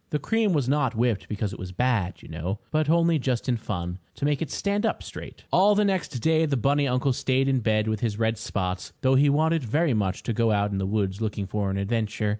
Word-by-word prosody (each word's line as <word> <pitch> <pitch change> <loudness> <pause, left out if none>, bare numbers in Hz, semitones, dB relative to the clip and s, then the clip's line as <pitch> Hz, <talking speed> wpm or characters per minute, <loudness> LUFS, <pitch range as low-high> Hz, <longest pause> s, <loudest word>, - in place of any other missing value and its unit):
The 150 - 0
cream 220 +7 +1
was 145 -7 +1
not 135 -3 +1
whipped 115 -2 0
because 105 -1 -2
it - - -9
was 90 0 -6
bad, 105 -3 -1
you - - -11
know, 85 +5 -4
but 155 -1 +1
only 170 -1 +3
just 125 -2 -1
in 125 - +2
fun, 90 -5 -4 0.2
to - - -3
make 145 0 +1
it 160 - -2
stand 200 +6 -1
up - - -1
straight. - - -10
All 205 +3 +5
the 210 0 +3
next 190 -3 0 0.2
day 160 0 +3
the 140 -2 0
bunny 140 +4 +2
uncle 125 +1 +1
stayed 135 0 +1
in 135 -1 +2
bed 110 -1 +1
with 110 -1 -1
his 110 -2 -1
red 110 -1 0
spots, 90 -4 -3
though 130 -2 +3
he 140 +2 +5
wanted 160 +3 +2
very 145 +5 +1
much 100 -4 -1
to 115 - -2
go 115 +1 +2
out 105 0 +1
in 100 - -2
the 95 - -1
woods 100 0 -1
looking 105 -2 -2
for 100 0 -2
an 95 - -2
adventure. 105 +1 -1
120 Hz, 245 wpm, -25 LUFS, 105-145 Hz, 0.2 s, All